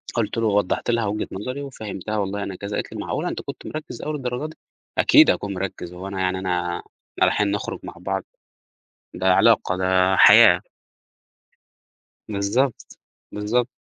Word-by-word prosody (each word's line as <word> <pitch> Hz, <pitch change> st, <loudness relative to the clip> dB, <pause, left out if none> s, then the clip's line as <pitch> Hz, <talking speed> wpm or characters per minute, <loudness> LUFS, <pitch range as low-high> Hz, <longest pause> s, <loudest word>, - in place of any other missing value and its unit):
قُلت 115 Hz, -1 st, -1 dB
له 115 Hz, -, +1 dB
ووضحّت 105 Hz, +3 st, +1 dB
لها 115 Hz, -2 st, +1 dB
وجهة 105 Hz, +1 st, -2 dB
نظري 125 Hz, +8 st, -5 dB
وفهّمتها 110 Hz, -5 st, -5 dB
والله 100 Hz, 0 st, -2 dB
أنا 95 Hz, -, -5 dB
كذا، 100 Hz, +2 st, -5 dB
قالت -, -, -4 dB
لي: -, -, -6 dB
"معقولة! -, -, -2 dB
أنت -, -, -5 dB
كنت -, -, -9 dB
مركِّز 155 Hz, 0 st, -7 dB
أوي 155 Hz, -, -3 dB
للدرجة 135 Hz, +1 st, -3 dB
دي؟" -, -, -15 dB, 0.4 s
أكيد 310 Hz, +1 st, +6 dB
هاكون 100 Hz, -1 st, -3 dB
مِرَكِّز، 90 Hz, -2 st, -5 dB
هو 90 Hz, +2 st, -7 dB
أنا 95 Hz, -1 st, -5 dB
يعني 95 Hz, 0 st, 0 dB
أنا، 90 Hz, -2 st, -1 dB
إحنا -, -, -9 dB, 0.4 s
رايحين 105 Hz, -1 st, +2 dB
نُخرُج 100 Hz, -, -3 dB
مع -, -, -8 dB
بعض! -, -, -3 dB, 0.9 s
ده 95 Hz, +1 st, +2 dB
علاقة، 90 Hz, -, +3 dB
ده 95 Hz, 0 st, +2 dB
حياة. 100 Hz, -4 st, +8 dB, 1.7 s
بالضبط، 105 Hz, +6 st, -1 dB, 0.3 s
بالضبط. 115 Hz, +4 st, 0 dB
100 Hz, 160 wpm, -23 LUFS, 95-120 Hz, 1.7 s, حياة